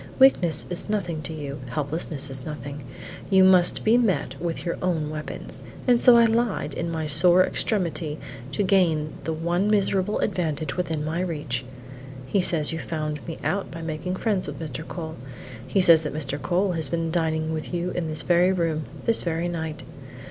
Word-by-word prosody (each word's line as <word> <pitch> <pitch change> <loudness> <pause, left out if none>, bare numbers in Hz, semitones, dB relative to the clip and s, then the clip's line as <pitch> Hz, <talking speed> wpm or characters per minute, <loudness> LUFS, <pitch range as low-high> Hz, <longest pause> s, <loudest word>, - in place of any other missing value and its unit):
Weakness 180 - +5
is 175 +4 +1
nothing 175 -7 -2
to 155 - -5
you; 145 -3 -6
helplessness 145 0 -1
is 130 -1 +1
nothing; 145 -1 -7 0.5
you 190 -2 +6
must 185 -2 +4
be 230 +3 +4
met 190 - 0
with 170 0 -3
your 170 - -1
own 160 -4 -1
weapons, 155 0 -4 0.3
and 245 -1 +4
so 245 -2 +8
I 235 - +6
lied 225 -9 0
in 170 - -3
my 160 -1 -3
sore 175 +5 +5
extremity 170 -7 -2 0.4
to 205 - 0
gain 170 -6 +2
the 160 - -1
one 170 +5 0
miserable 200 -1 +1
advantage 155 -4 -2
within 160 -4 -2
my 160 +2 -2
reach. 150 -8 -3 0.6
He 190 +9 +1
says 165 -4 +3
you 165 - -4
found 155 -2 -4
me 165 - -5
out 195 +7 -1
by 165 0 -8
making 160 +3 -3
friends 200 -2 -1
with - - -6
Mr. 155 0 -6
Cole. 160 -2 -6 0.5
He 190 - +2
says 165 -3 +7
that 150 -2 -5
Mr. 145 -1 -3
Cole 185 +2 +1
has 160 -5 0
been 165 +1 -1
dining 160 -1 0
with 155 -1 -5
you 175 0 -2
in 175 -2 -3
this 155 -1 -4
very 175 +1 +4
room, 165 -4 -1 0.2
this 230 -1 +2
very 170 0 -1
night. 160 -3 -4
165 Hz, 185 wpm, -24 LUFS, 155-185 Hz, 0.6 s, so